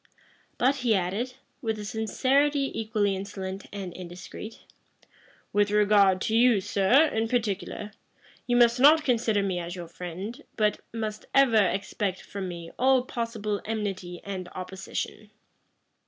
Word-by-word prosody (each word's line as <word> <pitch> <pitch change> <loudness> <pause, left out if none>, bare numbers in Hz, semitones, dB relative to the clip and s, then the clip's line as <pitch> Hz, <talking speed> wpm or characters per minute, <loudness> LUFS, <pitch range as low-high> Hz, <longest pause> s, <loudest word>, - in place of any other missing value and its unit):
But 265 +3 +3
he 240 -4 +2
added, 200 +8 -2 0.3
with 220 -2 -1
a 210 - -6
sincerity 270 +7 +1
equally 215 -3 0
insolent 190 0 -6
and 195 -3 -6
indiscreet, 180 +5 -9 0.9
"With 205 0 +3
regard 205 -2 +4
to 220 - 0
you, 235 -2 +5
sir, 200 +10 +4
in 225 +1 0
particular, 210 -3 -2 0.6
you 245 - +2
must 240 0 +5
not 305 +4 +7
consider 225 -5 +2
me 185 -2 -1
as 175 +1 -5
your 175 -2 -7
friend, 180 - -7
but 210 -2 +1
must 215 -2 -4
ever 230 -7 +5
expect 195 0 -2
from 195 -2 -5
me 170 -2 -7
all 260 0 +4
possible 225 -4 -3
enmity 195 -5 -4
and 185 -3 -5
opposition." 190 +3 -5
210 Hz, 135 wpm, -27 LUFS, 190-235 Hz, 0.9 s, not